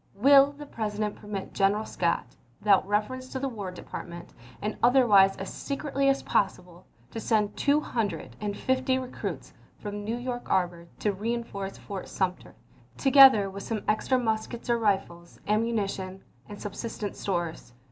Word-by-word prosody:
Will 275 +5 +6
the 295 +1 -10
President 210 -4 -3
permit 205 -2 -6
General 205 +2 +2
Scott, 170 -1 0 0.3
without 195 -2 +4
reference 235 +6 -1
to 265 - -4
the 275 - -1
War 210 -7 -5
Department, 175 -1 -8 0.3
and 210 +1 -3
otherwise 225 -6 +5
as 195 - -6
secretly 275 -1 -1
as 275 - +1
possible, 180 -3 -1 0.2
to - - -5
send 215 -2 +1
two 290 +1 +3
hundred 230 -8 -3
and 205 -1 -3
fifty 260 0 +1
recruits 255 -1 -5 0.2
from 205 -1 -6
New 225 +3 -2
York 245 0 -5
harbor 175 -2 0
to 210 - +1
reenforce 205 -2 -4
Fort 195 -2 -7
Sumter, 185 -2 -3 0.4
together 270 -7 +7
with 195 +1 -7
some 215 +1 -3
extra 215 +4 +2
muskets 235 +1 -2
or 235 - +2
rifles, 190 -5 -1
ammu 220 +3 +2
nition, 195 -3 -3 0.3
and 205 - -8
subsistence 205 0 -5
stores? 175 -8 -3
210 Hz, 150 wpm, -27 LUFS, 195-245 Hz, 0.4 s, together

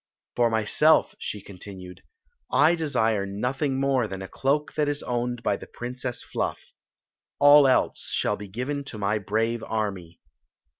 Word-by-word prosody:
"For 120 -1 +3
myself," 115 +8 +3
she 105 -2 -5
continued, 90 -2 -10 0.5
"I 145 +6 +5
desire 110 -11 0
nothing 130 +7 -2
more 135 -4 +1
than 95 -1 -6
a - - -7
cloak 145 +7 -1
that 150 -1 0
is 145 0 -3
owned 120 -1 -2
by - - +1
the - - -11
Princess 125 0 -5
Fluff. - - -4 0.7
All 145 0 +8
else 130 - +1
shall - - 0
be 105 - -9
given 130 +8 -3
to 115 - -8
my 105 +1 0
brave 110 +3 -1
army." 95 -6 -4
120 Hz, 150 wpm, -25 LUFS, 105-135 Hz, 0.7 s, All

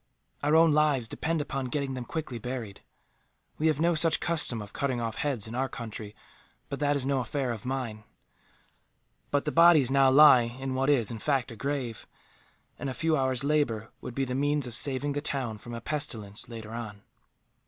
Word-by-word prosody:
Our 150 +2 +2
own 165 0 +6
lives 145 -5 +2
depend 160 +6 -2
upon 135 -2 -3
getting 140 +1 -2
them 125 -2 -5
quickly 135 -4 -5
buried. 115 -4 -6 0.8
We 155 - +2
have 155 -2 +1
no 170 +2 +3
such 165 0 +4
custom 160 -9 +1
of 105 -1 -9
cutting 130 -3 -1
off 115 -1 -3
heads, 130 -8 -1
in 110 - -8
our 130 +2 -1
country, 110 -2 -7 0.5
but 140 - -4
that 145 -1 +2
is 135 -2 0
no 135 -1 +1
affair 130 +1 -2
of 115 +1 -6
mine. 125 -5 -4 1.3
But 145 +1 0
the 150 - 0
bodies 165 -6 +6
now 135 -1 +5
lie 135 -2 +8 0.2
in 135 0 -3
what 135 +2 0
is, 120 -7 +3
in 115 - -6
fact, 135 -1 0
a - - -8
grave; 130 -3 -4 0.7
and 140 - -3
a 130 - -5
few 160 -1 +1
hours' 130 -2 +1
labour 140 -7 0
would 120 - -7
be 135 - 0
the 125 - -4
means 145 +1 +1
of 120 - -6
saving 140 +3 0
the 145 +1 -2
town 130 -7 -3
from 120 +2 -8
a 115 - -6
pestilence, 110 -8 -3
later 110 -2 -8
on. 110 -4 -7
135 Hz, 195 wpm, -28 LUFS, 120-145 Hz, 1.3 s, lie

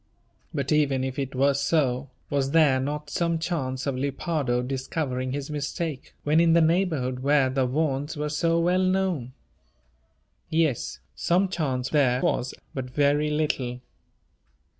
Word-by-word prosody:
But 140 -1 -2
even 140 -4 +2
if 130 +1 -3
it 135 -1 -3
were 140 +2 +3
so, 140 -2 +1 0.2
was 140 -1 +1
there 150 -5 +5
not 145 +3 -4
some 170 -1 0
chance 135 -6 -2
of 140 - 0
Lepardo 135 -2 -1
discovering 130 0 -2
his 140 +2 -4
mistake, 150 0 -4
when 150 +2 +3
in 165 -1 +5
the 170 - +6
neighbourhood 160 -7 +1
where 140 -1 +3
the 130 -1 +1
Vaughans 145 +2 -1
were 150 0 -2
so 165 +3 +1
well 180 +2 +2
known? 185 -9 0 1.2
Yes, 155 - 0
some 175 - +2
chance 135 -8 -1
there 130 -5 +3
was, 125 0 0 0.2
but 130 -2 -4
very 145 +3 +2
little. 140 -5 -1
145 Hz, 140 wpm, -26 LUFS, 130-160 Hz, 1.2 s, the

